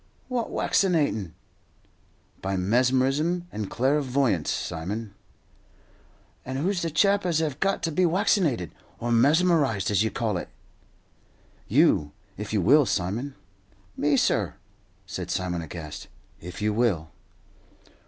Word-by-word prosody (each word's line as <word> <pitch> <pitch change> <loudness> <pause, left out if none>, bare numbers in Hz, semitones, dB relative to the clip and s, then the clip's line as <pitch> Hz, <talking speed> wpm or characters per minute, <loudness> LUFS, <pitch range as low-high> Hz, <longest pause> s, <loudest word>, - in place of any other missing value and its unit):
"What, 245 -3 -1
waccinatin'?" 145 - +1 1.1
"By 95 0 -2
mesmerism 130 - +1
and 105 -2 -4
clairvoyance, 130 - +1
Simon." 100 +6 -4 1.3
"And 130 +1 -4
who's 180 +5 0
the 165 - -1
chap 200 +6 +3
as 175 -3 +1
hev 155 -3 -1
got 195 0 0
to 165 - 0
be 185 +5 +1
waccinated 165 - +1 0.3
or 120 +1 -3
mesmerized, 140 - +3
as 100 -1 +3
you 110 - +2
call 110 -5 -1
it?" - - -6 1.2
"You, 75 -1 +3 0.2
if 105 +1 -6
you 105 -3 +1
will, 140 - +5
Simon." 110 +10 -2 0.6
"Me, 145 -1 +2
sir?" - - +1 0.5
said - - -6
Simon, 90 -2 -2
aghast. 80 -1 -8 0.3
"If 90 +3 -7
you 105 0 +1
will." 100 -9 0
125 Hz, 120 wpm, -26 LUFS, 95-155 Hz, 1.3 s, will